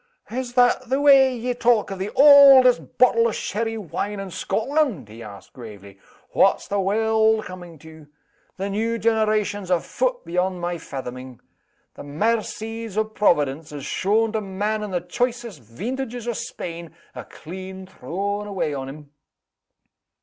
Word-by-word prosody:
"Is 250 0 -4
that 245 0 +3
the 265 +2 +1
way 270 -3 +5
ye 245 +2 -2
talk 240 -4 +1
of 195 - -6
the 195 +2 -3
auldest 275 -3 +7
bottle 230 -2 +4
o' - - -1
sherry 225 +2 -3
wine 205 +1 -4
in 195 -1 -7
Scotland?" 225 - -1
he 110 +2 -12
asked, 100 -3 -12
gravely. 100 -5 -12 0.3
"What's - - +2
the 200 - -1
warld 220 +2 +2
coming 175 -2 -10
to? 160 0 -15 0.5
The 195 +1 -3
new 225 +3 -1
generation's 215 -3 0
a 180 -2 +3
foot - - -2
beyond 180 +1 -1
my 175 0 -3
fathoming. 130 -3 -8 0.5
The - - -11
maircies 220 +6 -3
o' 215 - +2
Providence, 155 -9 0
as 145 -2 -7
shown 215 +7 0
to 220 -1 -2
man 205 +2 -3
in 210 - -5
the 180 -2 -2
choicest 235 - -3
veentages 240 - -6
o' 240 - -1
Spain, 170 -5 -7 0.2
are - - -8
clean 190 +3 -9
thrown 200 +5 -4
away 190 -7 -2
on 135 -1 -5
'em." 145 0 -12
205 Hz, 150 wpm, -22 LUFS, 170-230 Hz, 0.5 s, auldest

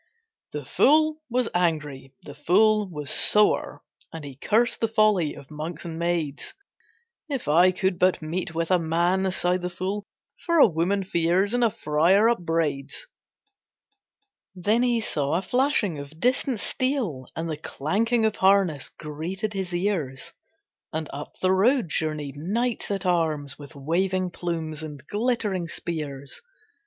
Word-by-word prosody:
The - - -5
fool 310 +1 +3
was 245 0 +1
angry, 150 -6 -1
the 145 - -9
fool 205 +7 +3
was 150 -4 -4
sore, 210 0 +3 0.3
And 165 -2 -8
he 140 -1 -8
cursed 225 - +1
the 225 - +3
folly 215 -8 +2
of 140 - -13
monks 155 +4 -6
and 165 -1 -6
maids. 170 - -2 0.7
"If 270 - -3
I 175 +5 +5
could 185 0 -1
but 185 0 +3
meet 165 +1 -4
with 165 +2 -1
a 180 - +5
man," 175 +4 +1
sighed 180 0 +1
the 180 - -2
fool, 190 +3 -4 0.4
"For 335 -1 +1
a 295 - +9
woman 190 +2 0
fears, 180 +3 +1
and 245 0 +2
a 230 - +5
friar 175 +5 +3
upbraids." 165 - -1 1.5
Then 210 +6 +1
he 240 -2 +2
saw 145 -6 -1
a 175 - +1
flashing 240 - +1
of 140 +3 -10
distant 250 0 +1
steel 240 - -2
And 165 +1 -3
the 155 -2 -3
clanking 220 - 0
of 220 -1 0
harness 190 -7 +3
greeted 175 +8 -5
his 190 -2 -3
ears, 175 -8 -2 0.6
And 155 -1 -4
up 145 +1 -7
the 185 - +4
road 220 - +3
journeyed 150 -2 -2
knights 225 +10 -2
at 195 -2 -2
arms, 155 -6 0
With 145 +2 -11
waving 180 +6 0
plumes 165 -3 -4
and 145 -3 -8
glittering 210 - -1
spears. 145 -5 -5
175 Hz, 145 wpm, -25 LUFS, 155-210 Hz, 1.5 s, a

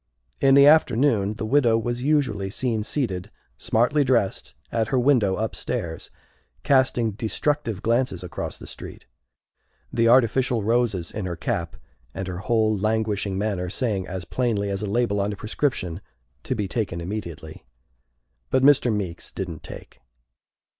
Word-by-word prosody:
In 135 0 +5
the 140 0 +8
afternoon 125 -8 +4
the 110 - -4
widow 120 -2 +3
was 120 +2 -2
usually 130 -9 +1
seen 115 +1 -1
seated, 105 -6 -2 0.3
smartly 125 +6 +2
dressed, 120 -7 0 0.2
at 115 -2 0
her 130 - 0
window 120 -7 +3
upstairs, 85 -6 -4 0.5
casting 130 -4 +2
destructive 115 +1 -2
glances 115 -5 0
across 90 - -5
the - - -11
street - - -9 0.9
the 115 0 +3
artificial 120 -1 +3
roses 110 -6 0
in 105 -3 -4
her 85 - -3
cap - - -3 0.4
and 95 - -4
her 90 -1 -5
whole 110 +2 +1
languishing 105 -2 -1
manner 100 -3 -2
saying 100 -3 -1
as 90 -1 -5
plainly 105 -1 -1
as 100 0 -2
a 105 - -2
label 105 -2 +1
on 100 +1 -1
a - - -5
prescription, 105 - -2 0.4
"To - - -1
be 105 - -2
Taken 100 -6 -2
Immediately!" 85 -4 -6 0.9
But 130 0 +2
Mr. 135 -4 +5
Meeks 95 -5 -4
didn't 90 -4 -6
take. - - -11
110 Hz, 145 wpm, -24 LUFS, 95-125 Hz, 0.9 s, the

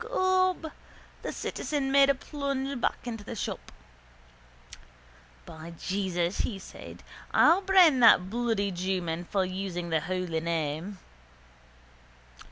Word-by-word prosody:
Gob, 370 -7 +1 0.5
the - - -4
citizen 280 -3 -3
made 275 0 +6
a 280 - +4
plunge 275 -2 -4
back - - -1
into 225 -3 -5
the 225 - -7
shop. - - -5 1.7
—By 160 +1 -10
Jesus, 185 -2 -1
says 195 -5 -4
he, - - -10 0.4
I'll 345 +4 +6
brain 370 -8 +5
that 225 -6 +6
bloody 225 -2 -1
jewman 175 -2 -2
for 190 +1 0
using 185 -2 -4
the 160 - +2
holy 180 -1 -2
name. 165 +3 -3
200 Hz, 115 wpm, -28 LUFS, 175-275 Hz, 1.7 s, made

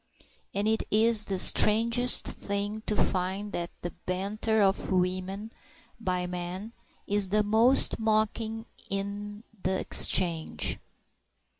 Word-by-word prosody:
And 200 +2 -2
it 220 0 0
is 220 0 +4
the 195 - -3
strangest 230 +6 +4
thing 205 +2 -4
to 210 - -1
find 190 +3 -2
that 170 -2 -4
the 175 - -4 0.2
banter 205 +4 -2
of 195 -1 0
women 185 +4 -3 0.5
by 180 -4 -2
men 180 +5 -7 0.3
is 205 -2 -1
the 210 +2 +1
most 225 +5 +3
mocking 220 +1 -1 0.2
in 205 +2 -5 0.2
the 190 0 -2
exchange. 170 -4 +2
205 Hz, 115 wpm, -27 LUFS, 185-220 Hz, 0.5 s, is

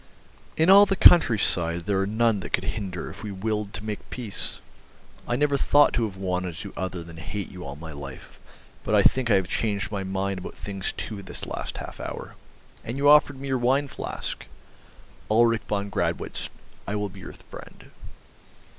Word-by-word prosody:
In 160 +4 +5
all 200 +1 +9
the 195 - +1
countryside 95 - +5
there 100 -1 +1
are 95 - 0
none 110 0 +2
that - - -8
could 90 - +2
hinder 95 -2 -4
if - - -12
we 105 - -5
willed 105 +1 -2
to 105 - -6
make 105 -1 -5
peace. 115 -6 -5 0.7
I 120 - 0
never 145 +1 +2
thought 145 +2 +5
to 115 - +1
have 100 -3 -6
wanted 90 -2 -2
to 100 - -6
do - - -16
other 95 -2 -4
than 85 0 -11
hate 95 +4 -5
you 90 - -9
all 70 0 -6
my 80 +2 -9
life, 70 -3 -10 0.4
but - - +1
I - - +5
think 130 -2 +3
I 105 - +6
have 95 -2 +2
changed 105 0 -1
my 100 -2 -2
mind 95 0 -2
about 90 - -8
things 95 -2 -4
too, 105 -3 -5
this 95 - -6
last - - -5
half - - -8
hour. - - -6 0.5
And 120 +4 -5
you 140 +1 +2
offered 145 -2 +6
me 140 0 -5
your 130 -1 +1
wine 135 +4 +2
flask... 120 - -6 0.8
Ulrich 115 +1 +4
von 100 -1 -2
Gradwitz, - - -2 0.4
I 100 - -2
will 105 -1 -1
be 95 +1 -12
your 90 - -9
friend." - - -13
100 Hz, 195 wpm, -26 LUFS, 95-120 Hz, 0.8 s, all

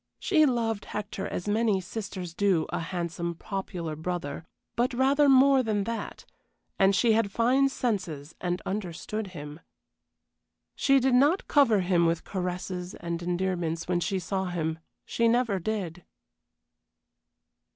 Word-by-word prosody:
She 310 -6 +3
loved 225 -4 -1
Hector 205 -2 -4
as 180 - -5
many 210 -1 +2
sisters 185 -2 -6
do 185 -4 +2
a - - -2
handsome, 170 0 -3
popular 175 -4 -5
brother, 160 -2 -4 0.3
but 245 +2 +1
rather 275 +3 +4
more 270 0 +6
than 215 -4 0
that, 230 +2 -5 0.5
and 195 0 +5
she 230 +3 +4
had 215 -2 +1
fine 255 +5 +3
senses 180 - -3
and 180 0 -2
understood 200 +2 -4
him. 150 -4 -9 1.1
She 275 0 +3
did 260 0 +2
not 290 +9 +3
cover 230 -9 +4
him 175 -2 +3
with 165 0 0
caresses 180 -1 -4
and 170 0 -4
endearments 175 -2 -2
when 180 -1 +1
she 175 +3 -1
saw 190 +1 -2
him; 160 -3 -2 0.3
she 235 - +1
never 230 -4 +2
did. 180 -3 -3
190 Hz, 135 wpm, -28 LUFS, 175-230 Hz, 1.1 s, more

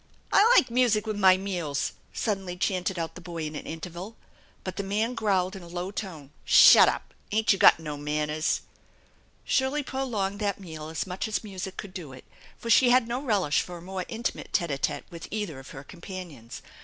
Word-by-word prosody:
" - - -15
I 435 +4 +6
like 250 - +4
music 235 -3 +3
with 215 -1 -2
my 190 -1 +6
meals! 175 -7 -2
" - - -34
suddenly 195 -5 -3
chanted 185 0 -1
out 165 -1 -3
the 180 - -11
boy 170 -2 -6
in 155 0 -5
an - - -7
interval. 175 +6 -7 0.5
But 185 -1 -5
the - - 0
man 215 +5 0
growled 195 -5 0
in 190 - -8
a 175 - -11
low 175 +2 -4
tone: 165 -9 -7
" - - -34
Shut - - +8
up! - - -5 0.2
Ain't 220 0 +3
you 195 - -4
got - - +7
no 150 -2 -5
manners? 150 +1 -1 0.4
" - - -35
Shirley 270 +2 +1
prolonged 225 -8 -2
that 200 -2 -1
meal 160 -5 -8
as 160 - -3
much 185 +2 -4
as 220 - -2
music 190 -2 -6
could 200 -3 -7
do 160 -8 -7
it, 130 - -13 0.3
for 230 - -3
she 250 +2 +6
had 250 -1 +4
no 245 +2 -2
relish 200 - +1
for 175 -1 -7
a - - -11
more 185 0 -5
intimate 230 +1 -4
tete 170 -3 0
a 140 - -2
tete - - -2
with 170 -1 -8
cither 205 -10 -3
of 135 - -12
her 135 - -9
companions. 170 - -9
185 Hz, 215 wpm, -27 LUFS, 165-215 Hz, 0.5 s, Shut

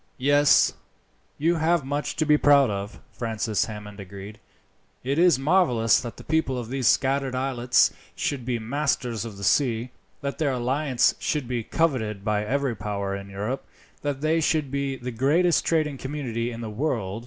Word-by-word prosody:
"Yes, 145 +2 +4 0.6
you 165 +3 +2
have 160 -2 +1
much 145 +2 -2
to 155 - 0
be 150 0 +5
proud 140 -5 +5
of," 100 +2 -5
Francis 110 -2 -1
Hammond 105 -2 -9
agreed. 100 +2 -9 0.6
"It 140 +5 0
is 175 -3 +5
marvellous 135 - +3
that 120 -2 -7
the - - -11
people 160 -5 0
of 120 -2 -5
these 130 -2 0
scattered 135 0 +2
islets 125 -2 +2 0.2
should 140 -4 -2
be 120 0 -1
masters 120 -2 -1
of 110 -4 -8
the 100 - -8
sea, 120 -1 +1 0.3
that 140 0 -4
their 145 -4 +1
alliance 130 +1 +1
should 150 -5 -2
be 120 -1 -2
coveted 110 -11 -1
by 105 -1 +1
every 135 +2 -1
power 100 -1 -3
in 100 0 -8
Europe, 105 +7 -4 0.4
that 145 -2 -3
they 160 +2 +2
should 155 -3 0
be 140 -1 -1
the 125 -1 -6
greatest 150 +9 +2
trading 155 -4 +1
community 125 -5 -3
in 115 0 -7
the 115 - -5
world. 110 -5 -2
130 Hz, 170 wpm, -25 LUFS, 110-145 Hz, 0.6 s, be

